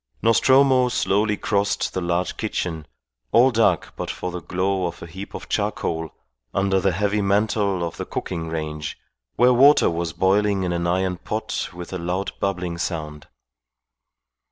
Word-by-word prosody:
Nostromo 130 +2 +5
slowly 105 -2 +1
crossed 100 0 0
the 95 - -2
large 85 +1 -1
kitchen, 80 -4 -3 0.4
all 125 +3 +5
dark 110 -7 +2
but - - -5
for 90 - -4
the 90 0 -5
glow 95 +3 -1
of 85 - -8
a - - -6
heap 95 +4 -9
of - - -7
charcoal 80 -1 -2 0.5
under 95 0 +2
the 95 +1 +2
heavy 105 +3 0
mantel 100 -2 +1
of 85 - -4
the - - -4
cooking 80 -1 -4
range, 75 -2 -4 0.4
where 125 +1 +5
water 140 0 +6
was 85 0 -2
boiling 100 +2 +2
in 90 -1 -1
an 85 0 -1
iron 90 +1 0
pot 110 +5 -3
with 90 0 -9
a 95 - -3
loud 90 +3 -2
bubbling 90 -3 -2
sound. 75 -4 -4
95 Hz, 155 wpm, -23 LUFS, 85-105 Hz, 0.5 s, water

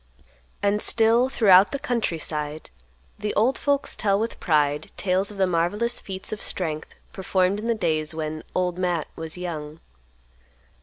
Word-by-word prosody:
And 205 +1 +2
still, 230 +3 +4
throughout 200 -6 +6
the 280 - -1
country 235 -10 -1
side, 150 - -5 0.5
the 210 0 -3
old 235 +6 +3
folks 285 -1 +1
tell 200 -2 +1
with 225 +2 -3
pride 150 -2 +1
tales 190 0 +1
of 210 - -9
the 190 - +3
marvelous 185 +7 0
feats 190 -1 -6
of 210 - -6
strength 155 -4 -3 0.2
performed 190 +1 +1
in 220 - -4
the 235 - +2
days 160 -5 -1
when 155 0 -4
"Old 180 -1 0
Matt" 175 -4 0
was 160 +1 -6
young. 160 -3 -6
185 Hz, 155 wpm, -24 LUFS, 160-210 Hz, 0.5 s, throughout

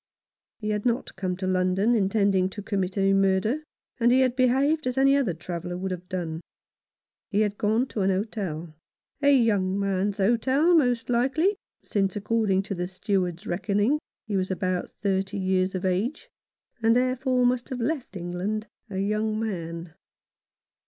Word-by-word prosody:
He 215 -1 -3
had 210 -1 -1
not 240 0 -1
come 185 -2 -2
to 190 - -4
London 185 +4 +2
intending 195 -3 +2
to 205 +1 -8
commit 195 -2 -2
a 195 0 +3
murder, 195 +9 +2 0.4
and 235 0 +4
he 260 +1 +5
had 255 -1 +2
behaved 270 +4 +2
as 250 +1 -2
any 275 +1 +5
other 240 - +1
traveller 175 +1 -5
would 190 +1 -3
have 180 0 -6
done. 165 -3 -3 0.9
He 210 0 +1
had 205 -1 -1
gone 220 +4 +2
to 210 - -3
an 190 - +2
hotel 185 -5 -3 0.3
— - - -51
a 285 0 +5
young 200 -5 +2
man's 195 0 0
hotel, 260 - +3
most 245 -7 +2
likely, 270 - +2 0.3
since, 195 -2 0
according 205 -2 +1
to 200 - -4
the 180 -1 -3
Steward's 185 -1 -2
reckoning, 205 +9 +1 0.3
he 210 - -3
was 190 -1 0
about 185 -1 -1
thirty 195 0 0
years 190 0 +1
of 185 +1 -3
age, 200 - -1 0.5
and, 225 +1 +4
therefore, 255 0 +2
must 245 +1 +1
have 255 -2 -4
left 255 -4 -2
England 180 +5 -3 0.2
a 190 - -5
young 215 +2 0
man. 170 -6 -4
205 Hz, 165 wpm, -26 LUFS, 185-240 Hz, 0.9 s, he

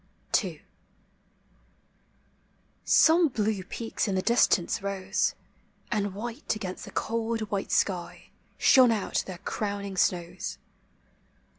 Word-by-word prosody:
ii. - - -7 2.2
Some 330 +1 +5
blue 215 -6 -1
peaks 225 +4 -3
in 195 - 0
the 185 - 0
distance 230 -3 +2
rose, 195 0 -1 0.6
And 205 -3 -1
white 235 +5 -4
against 185 -4 -6
the - - -10
cold 230 0 -2
white 200 -1 -2
sky 180 -3 -1 0.3
Shone 255 -2 +6
out 215 -3 0
their 185 -2 -6
crowning 200 0 -4
snows. 180 0 -1
205 Hz, 105 wpm, -27 LUFS, 190-230 Hz, 2.2 s, Shone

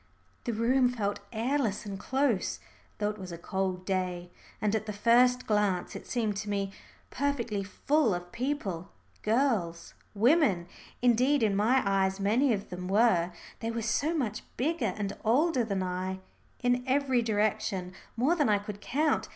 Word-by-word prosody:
The 240 - -1
room 245 +3 +3
felt 205 -5 -2
airless 235 -2 0
and 195 -2 -5
close, 265 -5 0 0.4
though 210 0 0
it 210 - -11
was 185 -2 -7
a 170 - -6
cold 185 +1 -2
day. 180 -2 -2 0.3
And 210 -1 0
at 220 0 -1
the 210 - -3
first 245 +4 +4
glance 205 -4 0
it - - -8
seemed 220 -4 -1
to 210 +1 -4
me 200 -1 -1 0.4
perfectly 245 -7 -1
full 235 - +1
of 175 0 -7
people 230 - -3 0.3
girls 215 -8 0 0.2
women 230 - +3 0.4
indeed 250 +3 +4
in 205 -2 +2
my 235 +6 +3
eyes 195 -1 +1
many 230 +7 +3
of 200 -4 -2
them 180 0 -5
were, 190 -4 +3 0.3
they 225 - -3
were 230 0 -3
so 280 +9 +1
much 225 -7 -2 0.2
bigger 260 - 0
and 200 -1 -3
older 260 +4 +3
than 200 -4 -1
I 185 +1 -3 0.4
in 245 0 +2
every 265 -2 +2
direction, 205 -4 0 0.2
more 265 +8 +3
than 295 -8 +2
I 210 - +4
could 205 0 -7
count. 300 +7 0
215 Hz, 160 wpm, -29 LUFS, 195-250 Hz, 0.4 s, first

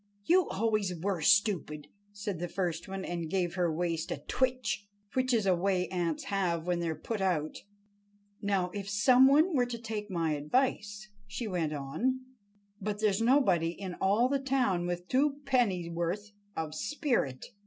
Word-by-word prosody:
"You 365 +1 +4
always 205 -4 0
were 185 -1 -1
stupid," 165 -6 +2 0.2
said 205 -3 -5
the 175 - -2
first 175 -2 -2
one, 190 0 -5
and 170 -2 -4
gave 180 -1 0
her 175 -2 +1
waist 165 0 -2
a - - -2
twitch—which 255 -1 -2
is 225 -4 +2
a 185 -2 +4
way 180 0 +1
ants 170 -4 -1
have 175 -5 -1
when 175 -1 0
they 170 -1 -1
are 160 - -2
put 220 +3 -4
out. 165 -5 0 0.8
"Now, 195 -3 0
if 200 -1 -5
some 250 +5 +6
one 310 +5 +4
were 245 -2 +3
to 240 -1 -4
take 220 -2 -5
my 165 -4 0
advice," 205 - -1 0.2
she 220 +3 -4
went 170 -6 -1
on, 215 - -1 0.6
"but 205 +1 -2
there's 210 -1 +2
nobody 225 - +3
in 185 +1 -6
all 205 +6 +3
the 275 +1 0
town 255 -10 +1
with 175 0 -3
two 280 +2 +1
pennyworth 190 -5 0 0.2
of 160 -1 -3
spirit. 215 - -1
195 Hz, 165 wpm, -30 LUFS, 175-230 Hz, 0.8 s, some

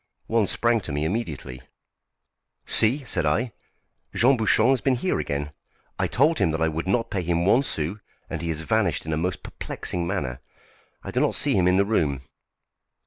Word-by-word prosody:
One 110 -3 +1
sprang 120 +2 +2
to 80 - -7
me 75 +2 -1
immediately. 80 - -4 1.0
"See!" 130 +6 +3
said 115 - +2
I, 80 +11 0 0.6
"Jean 130 +4 +5
Bouchon 110 +1 +3
has 135 - +1
been 135 -2 +2
here 180 +10 -1
again; 70 +1 -3 0.5
I - - +1
told 150 +6 +2
him - - +3
that 80 0 -2
I - - +3
would 80 +3 -4
not 115 +4 0
pay 95 - -1
him 85 0 0
one 115 +7 +5
sou, 85 - -2 0.3
and - - -5
he 85 - -3
has 80 -1 -2
vanished 95 -4 0
in 80 - -2
a - - 0
most 90 +2 -2
perplexing 85 -1 -4
manner. 65 -6 -3 0.6
I - - -6
do - - 0
not - - +1
see - - +1
him 90 -2 +3
in 90 +1 +4
the 100 - +3
room." 75 -11 0
90 Hz, 195 wpm, -24 LUFS, 80-115 Hz, 1.0 s, Jean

